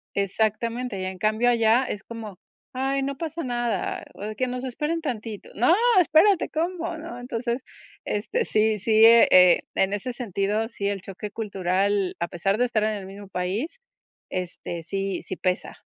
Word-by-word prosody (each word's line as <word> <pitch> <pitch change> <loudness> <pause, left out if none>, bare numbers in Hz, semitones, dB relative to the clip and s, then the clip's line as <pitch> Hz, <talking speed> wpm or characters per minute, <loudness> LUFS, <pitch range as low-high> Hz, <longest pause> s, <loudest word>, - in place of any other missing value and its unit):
Exactamente, 220 +3 -1
y - - -3
en 185 0 -5
cambio 215 +5 +2
allá 230 +1 +4
es 205 -5 -5
como: 215 -5 -8 0.3
"Ay, 270 +1 0
no 275 0 -3
pasa 330 0 -4
nada, 240 -5 -2
o - - -14
de, 215 +1 -4
que 255 - 0
nos 250 0 -4
esperen 300 +6 -2
tantito". 225 -7 -5
No, 250 +10 +4 0.3
espérate, 355 +3 +4
¿cómo? 335 +1 -2
¿No? 315 -6 -8
Entonces, 245 0 -3 0.5
este, 395 - -1
sí 215 0 +2
sí, 220 +2 +5
eh, 230 0 +8
e 180 -1 +7 0.2
en 190 +1 +2
ese 240 +5 -3
sentido, 215 -1 -1
sí 200 -4 -4
el 200 -2 -2
choque 200 +2 -7
cultural, 195 -2 0
a 170 - -1
pesar 195 +4 -1
de 245 - +3
estar 225 -3 0
en 215 0 +1
el 200 -2 -6
mismo 200 +1 -10
país, 195 - -3 0.5
este, 175 -2 -5
sí 195 +2 -3
sí - - -5
pesa. 185 0 -2
220 Hz, 175 wpm, -25 LUFS, 195-250 Hz, 0.5 s, eh